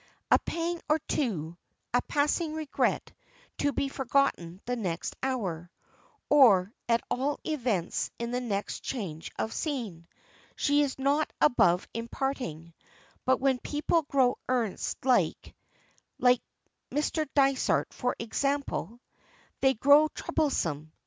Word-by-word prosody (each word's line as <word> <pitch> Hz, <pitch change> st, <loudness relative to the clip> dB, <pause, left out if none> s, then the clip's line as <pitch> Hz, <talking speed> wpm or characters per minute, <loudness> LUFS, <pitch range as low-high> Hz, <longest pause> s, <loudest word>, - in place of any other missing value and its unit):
A -, -, +7 dB
pang 335 Hz, 0 st, -3 dB
or 305 Hz, -, +5 dB
two, 175 Hz, -, -2 dB, 0.4 s
a 245 Hz, -, +4 dB
passing 305 Hz, +2 st, 0 dB
regret 310 Hz, -2 st, -1 dB, 0.5 s
to 285 Hz, -, +2 dB
be 275 Hz, -, -1 dB
forgotten 265 Hz, -10 st, 0 dB
the 245 Hz, -, -1 dB
next 180 Hz, -8 st, -3 dB
hour 190 Hz, -11 st, -2 dB, 0.6 s
or 220 Hz, -9 st, +6 dB, 0.2 s
at 230 Hz, 0 st, +3 dB
all 275 Hz, +4 st, 0 dB
events 240 Hz, -, -1 dB
in 235 Hz, 0 st, -4 dB
the 250 Hz, +1 st, -1 dB
next 205 Hz, -4 st, -3 dB
change 175 Hz, -, -5 dB
of 220 Hz, -, -2 dB
scene 220 Hz, -, -4 dB, 0.5 s
she 290 Hz, 0 st, +3 dB
is 280 Hz, -2 st, -1 dB
not 280 Hz, +3 st, +1 dB
above 180 Hz, -10 st, +4 dB
imparting, 230 Hz, -, -4 dB, 0.5 s
but 260 Hz, 0 st, +3 dB
when 265 Hz, -1 st, +2 dB
people 300 Hz, +5 st, 0 dB
grow 270 Hz, -4 st, +2 dB
earnest 245 Hz, -2 st, -1 dB
like 255 Hz, -2 st, +1 dB, 0.6 s
like 250 Hz, -1 st, +4 dB, 0.5 s
Mr. 300 Hz, +1 st, -1 dB
Dysart 275 Hz, -2 st, +2 dB
for 250 Hz, 0 st, -1 dB
example 240 Hz, -2 st, -2 dB, 0.6 s
they 265 Hz, 0 st, +3 dB
grow 285 Hz, +6 st, +6 dB
troublesome. 165 Hz, -, -1 dB
255 Hz, 120 wpm, -29 LUFS, 205-285 Hz, 0.6 s, A